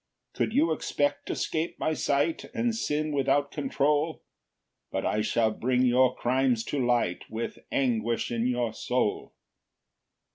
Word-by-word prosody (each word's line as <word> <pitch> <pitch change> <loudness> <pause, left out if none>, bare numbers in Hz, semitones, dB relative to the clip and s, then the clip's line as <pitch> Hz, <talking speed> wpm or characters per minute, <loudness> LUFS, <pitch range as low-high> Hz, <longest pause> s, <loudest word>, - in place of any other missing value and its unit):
4 - - 0
"Could - - -8
you 310 +4 +4
expect 145 0 -1
to - - -2
'scape 160 +1 -2
my 155 - 0
sight, 145 +2 0
"And 235 0 +1
sin 155 -8 -1
without 140 0 +1
control? 145 +2 0 0.7
"But - - -2
I 105 - +1
shall 110 +1 +2
bring 125 +3 +1
your 125 +1 +4
crimes 125 -2 +1
to 140 -3 +1
light, 120 -7 +1
"With 115 +1 -4
anguish 120 -4 0
in 120 +1 0
your 120 -3 0
soul." 125 -1 -1
130 Hz, 145 wpm, -28 LUFS, 120-145 Hz, 0.7 s, you